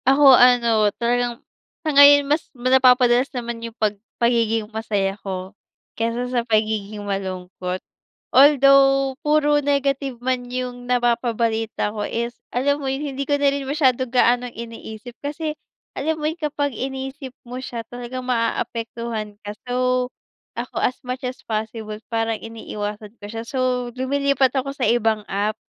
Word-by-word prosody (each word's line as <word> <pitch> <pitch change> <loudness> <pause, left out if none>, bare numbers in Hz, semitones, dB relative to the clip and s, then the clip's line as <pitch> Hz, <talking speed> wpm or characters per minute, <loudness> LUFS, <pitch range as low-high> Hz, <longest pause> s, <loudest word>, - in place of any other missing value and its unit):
Ako 275 0 +7
ano, 235 -4 +5
talagang 240 +1 -1 0.4
sa 310 - 0
ngayon 285 0 +8
mas 295 +3 0
napapadalas 255 0 +4
naman 235 -1 -4
yung 230 0 -7
pag 215 -1 +1 0.2
pagiging 230 -2 +2
masaya 205 -3 -1
ko 190 0 -5 0.4
kaysa 230 +2 -1
sa 245 - +2
pagiging 215 -2 -1
malungkot. 185 -2 -4 0.5
Although 275 -1 +6
puro 295 -1 +3
negative 275 -2 0
man 250 -1 -2
yung 245 -1 -5
napapabalita 230 -3 0
ko 210 - -4
is 235 +1 -2 0.2
alam 285 +4 0
mo 270 - -2
yung 275 +1 -3
hindi 275 +1 -4
ko 285 - +3
na 285 -1 +3
rin 280 -1 -3
masyado 260 -4 +2
gaanong 245 0 +2
iniisip 230 0 -8
kasi 300 +2 -3 0.4
alam 315 +3 -1
mo 300 - -4
yung 320 +3 -2
kapag 290 -2 -1
inisip 265 +2 -5
mo 250 +2 -6
siya 235 -3 -6
talagang 245 +1 -6
maaapektuhan 230 -2 -2
ka. 205 - -4 0.2
So, 250 0 +1 0.5
ako - - -4
as 250 - +1
much 255 +1 -4
as 255 - -7
possible 220 -1 -4
parang 225 -1 -1
iniiwasan 210 -1 -6
ko - - -8
siya. 225 +1 -5
So, 260 +3 -4 0.3
lumilipat 270 0 +1
ako 270 +1 -1
sa 270 -3 -1
ibang 225 -3 +1
app 205 +2 -1
245 Hz, 145 wpm, -22 LUFS, 225-270 Hz, 0.5 s, ngayon